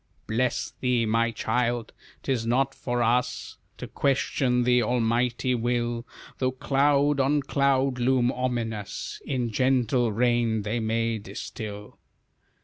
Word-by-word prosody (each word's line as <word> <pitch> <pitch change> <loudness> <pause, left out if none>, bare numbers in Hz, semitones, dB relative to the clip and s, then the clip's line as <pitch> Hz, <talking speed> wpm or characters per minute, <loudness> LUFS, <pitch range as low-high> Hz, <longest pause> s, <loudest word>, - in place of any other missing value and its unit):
"Bless 120 +2 -1
thee, 125 -3 +1
my 115 +2 +2
child! 120 +1 -1 0.3
'Tis 130 -4 0
not 135 +3 +1
for 120 -2 -2
us 125 +2 -1 0.2
To - - -6
question 130 -2 +1
the 125 0 +4
Almighty 120 +1 +1
will, 120 0 -1 0.3
Though 130 -1 0
cloud 140 +2 +2
on 140 +2 +2
cloud 135 -2 +1
loom 125 0 +2
ominous, 120 -5 -3
In 125 -4 -1
gentle 125 0 +2
rain 115 -1 +1
they 110 +3 -1
may 115 0 0
distil." 105 +1 -8
120 Hz, 120 wpm, -26 LUFS, 115-130 Hz, 0.3 s, the